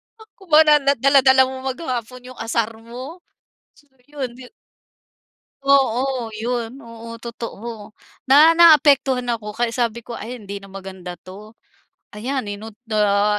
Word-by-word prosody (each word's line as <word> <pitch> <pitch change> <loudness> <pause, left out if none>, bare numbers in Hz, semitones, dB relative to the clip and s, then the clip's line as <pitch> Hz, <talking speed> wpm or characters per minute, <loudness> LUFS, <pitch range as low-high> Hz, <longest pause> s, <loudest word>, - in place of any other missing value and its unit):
Ako 420 -3 -19
ba 315 -1 +7
na 300 -1 +5
na 280 0 +2
dala-dala 265 0 +5
mo 260 0 -5
maghapon 255 -4 -5
yung 255 - -15
asar 230 0 -1
mo. 250 +9 -10 0.5
So 295 -1 -26 0.2
yun, 265 -4 -6
yun 250 -1 -13 1.1
oo 265 -3 +1
yun, 235 +3 -4
oo 230 0 -10
totoo. 230 -2 -8 0.3
Na 300 +5 +6
naapektuhan 280 -6 +5
ako 210 -1 -8
kaya 235 +2 -1
sabi 235 -1 -2
ko, 235 0 -8
"Ay 245 +3 -7
hindi 200 0 -7
na 200 - -12
maganda 190 -2 -8
'to." 200 +5 -13 0.6
Ayan 255 +6 -3
yun 205 - -6
no 220 +2 -9 0.3
ah, 210 0 +2
245 Hz, 145 wpm, -20 LUFS, 220-275 Hz, 1.1 s, ba